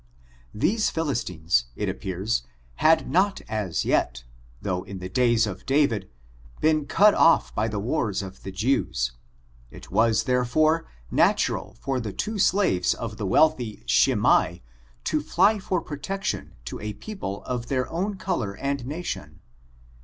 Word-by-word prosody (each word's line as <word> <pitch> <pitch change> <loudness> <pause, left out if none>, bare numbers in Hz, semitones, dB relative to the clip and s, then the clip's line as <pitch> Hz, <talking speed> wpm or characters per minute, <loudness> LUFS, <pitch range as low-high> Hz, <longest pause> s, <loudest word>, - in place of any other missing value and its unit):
These 210 - +2
Philistines, 90 - 0
it - - -2
appears, 95 - -2 0.4
had 160 +1 +4
not 195 +3 +2
as 105 -6 -2
yet, - - +1 0.4
though 90 +5 -2
in 95 +1 -8
the 90 0 -6
days 120 +1 +3
of 95 -2 -6
Da« 145 +2 +4
vid, 105 -8 -3 0.5
been 155 -2 +2
cut 205 +8 +5
off 165 - +4
by 105 +2 0
the 105 -2 -3
wars 105 -3 -1
of 95 0 -10
the 95 - -7
Jews. 95 - 0 0.6
It - - -13
was, 110 +2 +3
therefore, 155 +6 +2 0.3
naiural - - +1
for 135 -2 -2
the 110 -5 -5
two 215 -1 -3
slaves 180 - +2
of 110 -3 -6
the 105 - -3
wealthy 125 -2 +2
Shimei - - +3 0.4
to 155 - 0
fly 195 +8 +3
for 185 -1 -1
protection 195 +8 -4
to - - -6
a 105 0 -4
people 105 - -6
of 120 -2 -4
their 130 -2 0
own 195 +5 -2
color 110 - -2
and 140 -1 -2
nation. 130 - -5
120 Hz, 145 wpm, -25 LUFS, 100-160 Hz, 0.6 s, cut